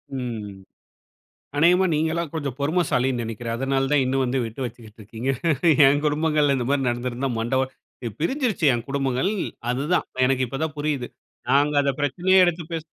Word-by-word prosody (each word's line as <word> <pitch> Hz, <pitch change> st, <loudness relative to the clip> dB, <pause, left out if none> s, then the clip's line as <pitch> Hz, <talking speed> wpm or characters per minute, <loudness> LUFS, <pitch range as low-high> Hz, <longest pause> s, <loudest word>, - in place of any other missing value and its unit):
ம். 110 Hz, -6 st, -5 dB, 1.0 s
அனேகமா 180 Hz, +4 st, +5 dB
நீங்கலாம் 160 Hz, +1 st, -1 dB
கொஞ்சம் 145 Hz, -6 st, -3 dB
பொறுமைசாலின்னு 140 Hz, -5 st, +1 dB
நினைக்கிறேன். 115 Hz, +1 st, -4 dB
அதனால 135 Hz, +1 st, 0 dB
தான் 145 Hz, -2 st, +4 dB
இன்னும் 135 Hz, +1 st, +1 dB
வந்து 130 Hz, +1 st, 0 dB
விட்டு 115 Hz, +4 st, -7 dB
வச்சுகிட்டு 110 Hz, -2 st, -11 dB
இருக்கீங்க. 115 Hz, +5 st, -5 dB, 0.6 s
என் 145 Hz, +2 st, +4 dB
குடும்பங்கள்ல 150 Hz, -1 st, +2 dB
இந்த 120 Hz, -, -2 dB
மாதிரி 135 Hz, -3 st, +1 dB
நடந்திருந்தா, 125 Hz, +2 st, -2 dB
மண்ட 115 Hz, +3 st, -1 dB
ஒ 130 Hz, -, +1 dB, 0.6 s
பிரிஞ்சுருச்சு 240 Hz, -, 0 dB
என் 120 Hz, -1 st, -3 dB
குடும்பங்கள், 135 Hz, +6 st, 0 dB, 0.4 s
அது 125 Hz, +3 st, -1 dB
தான். -, -, +2 dB, 0.2 s
எனக்கு 130 Hz, 0 st, +1 dB
இப்ப 135 Hz, +3 st, -5 dB
தான் 155 Hz, -2 st, -3 dB
புரியுது. 145 Hz, -4 st, -2 dB, 0.4 s
நாங்க 145 Hz, +2 st, +3 dB
அத 140 Hz, -1 st, +1 dB
பிரச்சனையே 180 Hz, +7 st, +3 dB
எடுத்து 175 Hz, -1 st, +1 dB
பேசு 160 Hz, -1 st, -3 dB
135 Hz, 155 wpm, -23 LUFS, 125-155 Hz, 1.0 s, அனேகமா